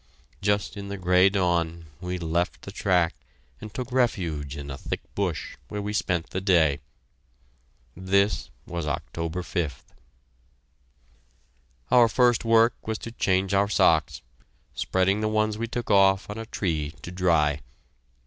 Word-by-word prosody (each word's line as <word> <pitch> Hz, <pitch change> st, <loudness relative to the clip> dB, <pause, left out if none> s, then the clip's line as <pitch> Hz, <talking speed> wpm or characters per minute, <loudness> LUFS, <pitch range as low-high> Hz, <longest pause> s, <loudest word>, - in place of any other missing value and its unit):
Just 100 Hz, +1 st, 0 dB
in 100 Hz, 0 st, -6 dB
the 100 Hz, 0 st, -5 dB
gray 90 Hz, +1 st, +4 dB
dawn, 85 Hz, -4 st, 0 dB
we 90 Hz, 0 st, -4 dB
left 85 Hz, +1 st, -1 dB
the 100 Hz, -, -7 dB
track 90 Hz, -4 st, +2 dB, 0.5 s
and 110 Hz, -, -9 dB
took 125 Hz, +1 st, -5 dB
refuge 85 Hz, -, 0 dB
in 70 Hz, -1 st, -6 dB
a 70 Hz, -, -6 dB
thick -, -, -4 dB
bush, 95 Hz, -6 st, -3 dB
where 105 Hz, -, -5 dB
we 105 Hz, +1 st, -3 dB
spent 85 Hz, -5 st, -1 dB
the 95 Hz, -, -2 dB
day. 80 Hz, -7 st, +3 dB, 1.2 s
This 100 Hz, +3 st, +1 dB, 0.2 s
was 85 Hz, -2 st, -4 dB
October 85 Hz, +4 st, -3 dB
5th. 80 Hz, -7 st, -3 dB, 2.1 s
Our 120 Hz, -2 st, +7 dB
first 120 Hz, 0 st, +3 dB
work 115 Hz, 0 st, +5 dB
was 110 Hz, -1 st, -1 dB
to 115 Hz, -, -8 dB
change 95 Hz, -3 st, +1 dB
our 100 Hz, +1 st, +3 dB
socks, 80 Hz, -9 st, +2 dB, 0.5 s
spreading 95 Hz, -, +1 dB
the 110 Hz, -, +1 dB
ones 110 Hz, 0 st, 0 dB
we 115 Hz, -, -2 dB
took 120 Hz, +1 st, -3 dB
off 95 Hz, 0 st, +4 dB
on 105 Hz, -, -6 dB
a 115 Hz, -, -6 dB
tree 80 Hz, -7 st, -2 dB
to 85 Hz, -, -7 dB
dry. 80 Hz, -5 st, +2 dB
95 Hz, 145 wpm, -26 LUFS, 85-105 Hz, 2.1 s, Our